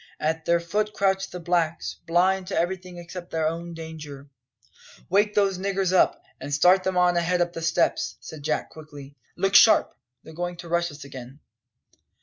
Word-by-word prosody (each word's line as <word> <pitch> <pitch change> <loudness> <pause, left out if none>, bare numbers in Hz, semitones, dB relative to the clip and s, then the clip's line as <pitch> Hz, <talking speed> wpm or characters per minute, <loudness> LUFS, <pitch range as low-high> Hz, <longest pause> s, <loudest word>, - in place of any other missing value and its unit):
At 160 +1 -1
their 170 0 +3
foot 210 +5 -2
crouched 195 -1 0
the 180 - -6
blacks, 170 -1 -1
blind 185 +2 +2
to 190 - -3
everything 180 0 -2
except 175 +1 -9
their 160 -1 0
own 170 +1 -4
danger.. 150 -4 -9 0.8
"Wake 205 +2 +2
those 195 -3 +2
niggers 195 -1 -1
up, 185 - +3 0.2
and 145 - -7
start 180 +6 +4
them 185 -1 -1
on 180 -1 +3
ahead 175 +1 +1
up 175 0 0
the 165 - -6
steps!" 165 0 0
said 155 -3 -10
Jack 150 +1 -2
quickly. 145 -3 -12 0.2
"Look 195 +2 0
sharp! 220 +1 +6 0.3
they're 160 - -12
going 175 +1 -4
to 170 -1 -10
rush 170 0 +1
us 145 -2 -11
again." 135 0 -10
175 Hz, 175 wpm, -25 LUFS, 160-185 Hz, 0.8 s, sharp